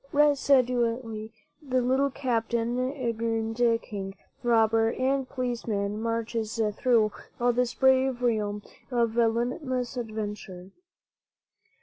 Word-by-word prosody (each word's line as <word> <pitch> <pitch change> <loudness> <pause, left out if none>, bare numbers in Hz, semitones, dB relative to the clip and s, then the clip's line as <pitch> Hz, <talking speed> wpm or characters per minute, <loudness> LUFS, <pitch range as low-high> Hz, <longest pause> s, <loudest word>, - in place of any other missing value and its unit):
Resolutely 250 -6 +2 0.3
the 260 -3 0
little 260 +3 +2
captain, 240 -1 -1
aeronaut, 230 -2 0
king, 195 -2 -6 0.3
robber 225 -2 +3
and 265 0 0
police 245 -3 -3
man 205 0 -1
marches 230 -1 -2 0.2
through 225 -4 +3 0.3
all 245 0 +3
this 245 0 0
brave 265 -1 +3
realm 210 -3 0 0.3
of 235 -3 +1
limitless 245 +2 0
adventure. 210 -5 -5
235 Hz, 95 wpm, -27 LUFS, 225-255 Hz, 0.3 s, robber